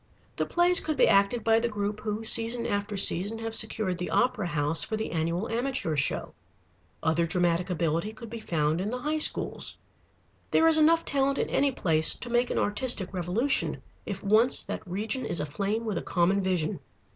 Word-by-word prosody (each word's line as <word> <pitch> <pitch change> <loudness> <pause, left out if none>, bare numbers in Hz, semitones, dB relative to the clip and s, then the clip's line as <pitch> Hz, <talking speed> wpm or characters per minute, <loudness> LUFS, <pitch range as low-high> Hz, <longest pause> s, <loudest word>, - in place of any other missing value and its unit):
The - - -1
plays 350 +1 +4
could 310 -2 -3
be - - +4
acted 200 +4 +2
by 225 0 +3
the 235 +1 -2
group 205 -1 -4
who, 215 0 -4
season 230 +1 +4
after 205 0 -3
season, 195 +3 +5
have 225 0 -6
secured 215 -4 -1
the 180 - -4
opera 245 -6 0
house 150 -1 0
for 220 - -4
the 220 - -4
annual 170 +5 -2
amateur 235 - -2
show. 140 -1 -2 0.7
Other 165 +1 +1
dramatic 175 +1 0
ability 170 +4 -2
could 230 +1 -11
be 230 - -6
found 160 -4 -1
in 200 - -3
the 250 - -4
high 300 +4 -2
schools. - - +1 0.7
There 325 - +3
is 320 -1 +4
enough 330 +2 +3
talent 275 0 0
in - - -2
any 280 0 +1
place 160 -9 +2
to 240 - -8
make 240 +1 +1
an - - -3
artistic 205 -2 +1
revolution, 185 +10 -1 0.2
if 195 -1 -7
once 220 +5 +3
that - - -6
region 215 +8 -3
is - - -2
aflame 200 +10 -3
with 210 -5 -2
a - - -7
common 185 +3 0
vision. 180 -6 -2
210 Hz, 190 wpm, -27 LUFS, 175-240 Hz, 0.7 s, season